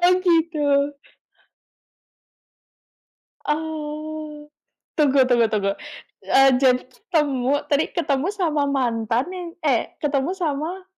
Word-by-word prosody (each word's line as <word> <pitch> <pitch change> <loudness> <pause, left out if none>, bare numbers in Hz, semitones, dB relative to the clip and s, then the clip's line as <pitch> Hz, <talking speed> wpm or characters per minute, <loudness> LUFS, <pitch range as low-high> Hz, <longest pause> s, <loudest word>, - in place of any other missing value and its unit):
Oh 355 +1 +6
gitu. 295 -4 +2 2.5
Oh. 305 0 -4 0.5
Tunggu 280 -3 +4
tunggu 240 -3 +3
tunggu. 200 -2 0 0.5
Eee, 270 0 +5
jadi 255 -2 +5
ketemu 280 -1 -1
tadi 290 +1 +2
ketemu 285 -3 0
sama 320 -8 0
mantan, 235 -3 0
yang 360 -2 -6 0.2
eh 265 -6 0
ketemu 295 +4 -1
sama 335 +2 -3
290 Hz, 95 wpm, -22 LUFS, 265-315 Hz, 2.5 s, Oh